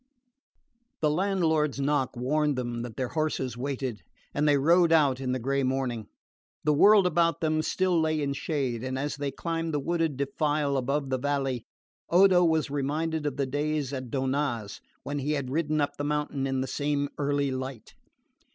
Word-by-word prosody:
The 150 Hz, -1 st, +3 dB
landlord's 160 Hz, -5 st, +1 dB
knock 140 Hz, -3 st, 0 dB
warned 145 Hz, +4 st, +1 dB
them 120 Hz, -2 st, -3 dB
that 120 Hz, -2 st, -7 dB
their 130 Hz, -2 st, -2 dB
horses 155 Hz, -6 st, -1 dB
waited, 130 Hz, -4 st, -3 dB, 0.3 s
and 150 Hz, +1 st, +1 dB
they 145 Hz, -1 st, +5 dB
rode 170 Hz, +4 st, +4 dB
out 145 Hz, -5 st, +4 dB
in 130 Hz, -1 st, -1 dB
the 130 Hz, -, 0 dB
grey 135 Hz, +3 st, 0 dB
morning. 130 Hz, -4 st, -1 dB, 0.6 s
The 150 Hz, -, +3 dB
world 200 Hz, +6 st, +6 dB
about 170 Hz, -1 st, +2 dB
them 155 Hz, -1 st, +1 dB
still 180 Hz, +1 st, +1 dB
lay 155 Hz, -1 st, +1 dB
in 140 Hz, -1 st, -1 dB
shade, 135 Hz, -5 st, -2 dB
and 130 Hz, 0 st, -3 dB
as 145 Hz, +2 st, -3 dB
they 145 Hz, -1 st, -2 dB
climbed 165 Hz, +1 st, -3 dB
the -, -, +1 dB
wooded 165 Hz, -1 st, -1 dB
defile 145 Hz, +1 st, 0 dB
above 135 Hz, +1 st, -1 dB
the 130 Hz, -, 0 dB
valley 135 Hz, -3 st, -1 dB, 0.4 s
Odo 180 Hz, 0 st, +6 dB
was 160 Hz, -4 st, +1 dB
reminded 150 Hz, +2 st, -1 dB
of 140 Hz, -2 st, -3 dB
the 140 Hz, -, +1 dB
days 145 Hz, 0 st, -2 dB
at 130 Hz, -2 st, -5 dB
Donnaz 130 Hz, -5 st, -2 dB, 0.2 s
when 145 Hz, 0 st, -3 dB
he 145 Hz, +2 st, -1 dB
had 140 Hz, -3 st, -3 dB
ridden 155 Hz, 0 st, 0 dB
up 145 Hz, 0 st, -1 dB
the 145 Hz, -, -3 dB
mountain 145 Hz, -2 st, -1 dB
in 135 Hz, -1 st, -1 dB
the 130 Hz, -, -2 dB
same 145 Hz, +1 st, -1 dB
early 145 Hz, -1 st, 0 dB
light. 130 Hz, -2 st, -6 dB
145 Hz, 180 wpm, -27 LUFS, 130-155 Hz, 0.6 s, world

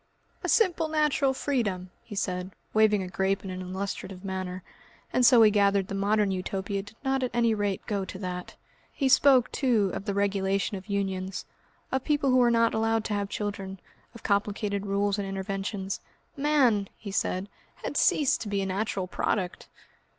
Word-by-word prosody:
"A -, -, -1 dB
simple 350 Hz, -7 st, +3 dB
natural 300 Hz, -3 st, +2 dB
freedom," 210 Hz, -10 st, -2 dB
he 210 Hz, -, -9 dB
said, 185 Hz, -1 st, -2 dB, 0.2 s
waving 215 Hz, -2 st, +4 dB
a -, -, -5 dB
grape 190 Hz, +1 st, 0 dB
in 190 Hz, -, -5 dB
an 185 Hz, 0 st, -5 dB
illustrative 190 Hz, 0 st, -5 dB
manner, 185 Hz, -1 st, -4 dB, 0.5 s
and 255 Hz, -, +3 dB
so 245 Hz, 0 st, +7 dB
we 220 Hz, -2 st, +7 dB
gathered 200 Hz, -2 st, +2 dB
the -, -, -4 dB
Modern 200 Hz, +1 st, +2 dB
Utopia 190 Hz, +1 st, -2 dB
did 205 Hz, +3 st, -14 dB
not 265 Hz, 0 st, +1 dB
at 255 Hz, -, 0 dB
any 235 Hz, -1 st, +3 dB
rate 205 Hz, -3 st, -2 dB
go 200 Hz, -2 st, -1 dB
to 185 Hz, -, -7 dB
that. 180 Hz, -2 st, -5 dB, 0.4 s
He 275 Hz, -, 0 dB
spoke, 260 Hz, -2 st, +5 dB
too, 225 Hz, -8 st, +2 dB
of 195 Hz, -, -5 dB
the 200 Hz, -, -2 dB
regulation 195 Hz, 0 st, 0 dB
of 190 Hz, -1 st, -8 dB
unions, 190 Hz, -1 st, -2 dB, 0.5 s
of 265 Hz, -1 st, 0 dB
people 290 Hz, -3 st, +2 dB
who 255 Hz, -, +5 dB
were 245 Hz, -1 st, +5 dB
not 230 Hz, -1 st, +3 dB
allowed 225 Hz, 0 st, +1 dB
to 210 Hz, -, -2 dB
have 200 Hz, -1 st, -1 dB
children, 195 Hz, -2 st, -4 dB, 0.4 s
of 230 Hz, -, -12 dB
complicated 200 Hz, 0 st, 0 dB
rules 200 Hz, +1 st, +1 dB
and 200 Hz, -, -2 dB
interventions. 195 Hz, 0 st, -3 dB, 0.4 s
"Man," 275 Hz, -9 st, +2 dB
he 205 Hz, -, -7 dB
said, 190 Hz, 0 st, -1 dB, 0.3 s
"had -, -, -6 dB
ceased 290 Hz, -4 st, +3 dB
to 220 Hz, -, -5 dB
be 200 Hz, -1 st, 0 dB
a -, -, -2 dB
natural 195 Hz, 0 st, -2 dB
product!" 185 Hz, 0 st, -2 dB
200 Hz, 180 wpm, -28 LUFS, 195-230 Hz, 0.5 s, so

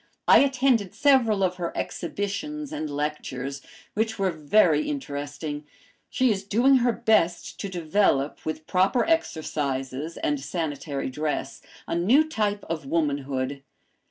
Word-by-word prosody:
I -, -, +8 dB
attended 260 Hz, -7 st, +2 dB
several 250 Hz, -8 st, +4 dB
of 180 Hz, -1 st, 0 dB
her 170 Hz, -2 st, -3 dB
exhibitions 270 Hz, -, -4 dB
and 155 Hz, -, -3 dB
lectures, 140 Hz, -2 st, -4 dB, 0.3 s
which 220 Hz, +1 st, -1 dB
were 195 Hz, -2 st, +1 dB
very 155 Hz, -, +3 dB
interesting. 145 Hz, -, -4 dB, 0.5 s
She 255 Hz, -2 st, +2 dB
is 195 Hz, -2 st, -2 dB
doing 240 Hz, +7 st, +4 dB
her 240 Hz, -1 st, +3 dB
best 220 Hz, -7 st, +1 dB
to 200 Hz, -, -4 dB
develop, 165 Hz, -5 st, +1 dB
with 155 Hz, 0 st, -4 dB
proper 190 Hz, +8 st, +2 dB
exercises 150 Hz, -, -2 dB
and 145 Hz, -1 st, -1 dB
sanitary 145 Hz, -3 st, -3 dB
dress, 150 Hz, +3 st, -3 dB, 0.2 s
a -, -, -4 dB
new 240 Hz, -, +4 dB
type 210 Hz, -8 st, -1 dB
of 160 Hz, -4 st, -4 dB
womanhood. 140 Hz, -3 st, -1 dB
175 Hz, 130 wpm, -25 LUFS, 145-220 Hz, 0.5 s, I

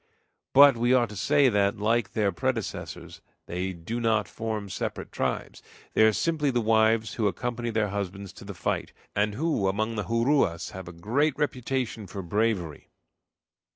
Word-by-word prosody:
But 140 Hz, 0 st, +8 dB
we 120 Hz, +2 st, +3 dB
ought 120 Hz, -3 st, +2 dB
to 105 Hz, -, -9 dB
say 140 Hz, +7 st, +3 dB
that, 100 Hz, -3 st, +2 dB
like 110 Hz, +1 st, +1 dB
their 105 Hz, -2 st, +1 dB
predecessors, 115 Hz, +4 st, -4 dB, 0.2 s
they 90 Hz, +2 st, -3 dB
do 90 Hz, +7 st, -5 dB
nor 110 Hz, -2 st, +2 dB
form 110 Hz, -2 st, -4 dB
separate 95 Hz, -, -4 dB
tribes; -, -, -3 dB, 0.3 s
they -, -, +3 dB
are 110 Hz, 0 st, +7 dB
simply 150 Hz, +5 st, 0 dB
the 120 Hz, -2 st, +1 dB
wives 110 Hz, 0 st, +3 dB
who 110 Hz, -3 st, +1 dB
accompany 120 Hz, +5 st, -2 dB
their 110 Hz, -2 st, 0 dB
husbands 100 Hz, -1 st, -5 dB
to -, -, -12 dB
the 100 Hz, -1 st, -8 dB
fight, 85 Hz, -, -2 dB, 0.2 s
and 105 Hz, 0 st, +1 dB
who, 150 Hz, -7 st, 0 dB
among 110 Hz, +4 st, 0 dB
the 105 Hz, -, -2 dB
Juruas, 115 Hz, -, +1 dB
have 95 Hz, -1 st, -8 dB
a -, -, -6 dB
great 120 Hz, -, 0 dB
reputation 125 Hz, -6 st, -2 dB
for 95 Hz, 0 st, -6 dB
bravery." 95 Hz, -4 st, -1 dB
110 Hz, 165 wpm, -27 LUFS, 100-120 Hz, 0.3 s, But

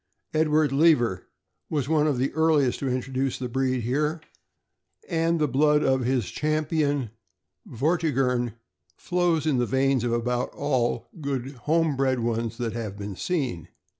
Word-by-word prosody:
Edward 155 Hz, -2 st, +2 dB
Lever 135 Hz, -, +3 dB, 0.4 s
was 145 Hz, -4 st, -1 dB
one 155 Hz, -1 st, +2 dB
of 145 Hz, -4 st, +1 dB
the 130 Hz, +2 st, -1 dB
earliest 155 Hz, -5 st, +2 dB
to 135 Hz, -, -2 dB
introduce 130 Hz, +1 st, -1 dB
the 130 Hz, -, -4 dB
breed 130 Hz, 0 st, 0 dB
here, 150 Hz, +7 st, 0 dB, 0.9 s
and 165 Hz, 0 st, +1 dB
the 150 Hz, -, +2 dB
blood 150 Hz, +3 st, +3 dB
of 130 Hz, 0 st, +2 dB
his 125 Hz, -4 st, 0 dB
Champion 150 Hz, -4 st, 0 dB, 0.6 s
Vortigern 130 Hz, -5 st, 0 dB, 0.4 s
flows 175 Hz, -3 st, 0 dB
in 145 Hz, -5 st, +2 dB
the 120 Hz, -, +1 dB
veins 135 Hz, -2 st, +2 dB
of 120 Hz, -, 0 dB
about 120 Hz, +1 st, 0 dB
all 130 Hz, -5 st, 0 dB
the 180 Hz, -, -15 dB
good 135 Hz, -2 st, -3 dB, 0.2 s
home 165 Hz, -2 st, +3 dB
bred 130 Hz, -1 st, +1 dB
ones 115 Hz, 0 st, -2 dB
that 115 Hz, -3 st, -3 dB
have 110 Hz, -4 st, -5 dB
been 100 Hz, -1 st, -6 dB
seen. 130 Hz, -, -2 dB
135 Hz, 150 wpm, -25 LUFS, 120-155 Hz, 0.9 s, Lever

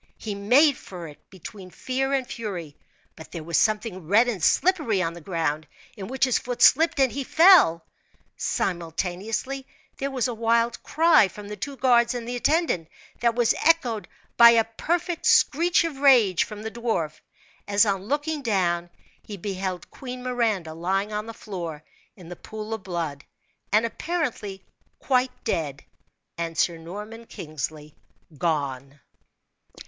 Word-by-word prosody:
He 215 Hz, -, -5 dB
made 250 Hz, +9 st, +4 dB
for 175 Hz, -3 st, -9 dB
it 150 Hz, -, -13 dB
between 190 Hz, +1 st, -11 dB
fear 265 Hz, +7 st, -2 dB
and 270 Hz, -2 st, 0 dB
fury, 180 Hz, -10 st, -6 dB, 0.4 s
but 160 Hz, -, -13 dB
there 165 Hz, -3 st, -6 dB
was 170 Hz, +1 st, -4 dB
something 210 Hz, -6 st, 0 dB
red 220 Hz, +7 st, +4 dB
and 205 Hz, -9 st, -3 dB
slippery 305 Hz, -, +2 dB
on 170 Hz, -2 st, -1 dB
the 170 Hz, -, -11 dB
ground, 160 Hz, -3 st, -2 dB, 0.3 s
in 195 Hz, -4 st, -7 dB
which 265 Hz, +2 st, -2 dB
his 255 Hz, -, +1 dB
foot 245 Hz, 0 st, -2 dB
slipped, 325 Hz, +1 st, +5 dB
and 265 Hz, -2 st, +4 dB
he 280 Hz, -, -3 dB
fell. 315 Hz, -, +6 dB, 0.5 s
Simultaneously 190 Hz, +10 st, -3 dB, 0.3 s
there 275 Hz, -, -2 dB
was 260 Hz, -3 st, -1 dB
a 245 Hz, -, -3 dB
wild 230 Hz, +1 st, +1 dB
cry 325 Hz, -, +4 dB
from 205 Hz, +2 st, -11 dB
the 210 Hz, -, -5 dB
two 275 Hz, +7 st, -6 dB
guards 240 Hz, -2 st, +3 dB
and 235 Hz, -1 st, -5 dB
the 245 Hz, -, -3 dB
attendant, 285 Hz, -, +1 dB, 0.3 s
that 235 Hz, 0 st, +1 dB
was 240 Hz, -2 st, +3 dB
echoed 250 Hz, -10 st, +2 dB, 0.3 s
by 235 Hz, 0 st, +10 dB
a 230 Hz, -1 st, +5 dB
perfect 340 Hz, +10 st, -2 dB
screech 340 Hz, +5 st, +4 dB
of 325 Hz, -5 st, -4 dB
rage 240 Hz, -10 st, +5 dB
from 210 Hz, -1 st, -9 dB
the 220 Hz, -, -5 dB
dwarf, 220 Hz, -11 st, -3 dB, 0.5 s
as 205 Hz, +2 st, +4 dB
on 195 Hz, -2 st, -1 dB
looking 295 Hz, +3 st, -1 dB
down 175 Hz, -7 st, 0 dB, 0.3 s
he 205 Hz, -, -9 dB
beheld 190 Hz, -1 st, -5 dB
Queen 250 Hz, -1 st, -8 dB
Miranda 225 Hz, -10 st, -1 dB
lying 195 Hz, +5 st, -1 dB
on 210 Hz, +1 st, -3 dB
the -, -, -5 dB
floor 175 Hz, -9 st, -7 dB, 0.3 s
in 180 Hz, -5 st, -14 dB
the 175 Hz, -, -8 dB
pool 215 Hz, +4 st, -7 dB
of 220 Hz, -, -4 dB
blood, 170 Hz, -6 st, -4 dB, 0.5 s
and 215 Hz, +2 st, +4 dB
apparently 230 Hz, -, -4 dB, 0.3 s
quite 255 Hz, -1 st, +1 dB
dead, 145 Hz, -4 st, -3 dB, 0.5 s
and 165 Hz, -1 st, -4 dB
Sir 170 Hz, -1 st, +1 dB
Norman 210 Hz, +7 st, -9 dB
Kingsley 155 Hz, 0 st, -6 dB, 0.4 s
gone. 140 Hz, -3 st, -2 dB
215 Hz, 155 wpm, -25 LUFS, 175-250 Hz, 0.5 s, by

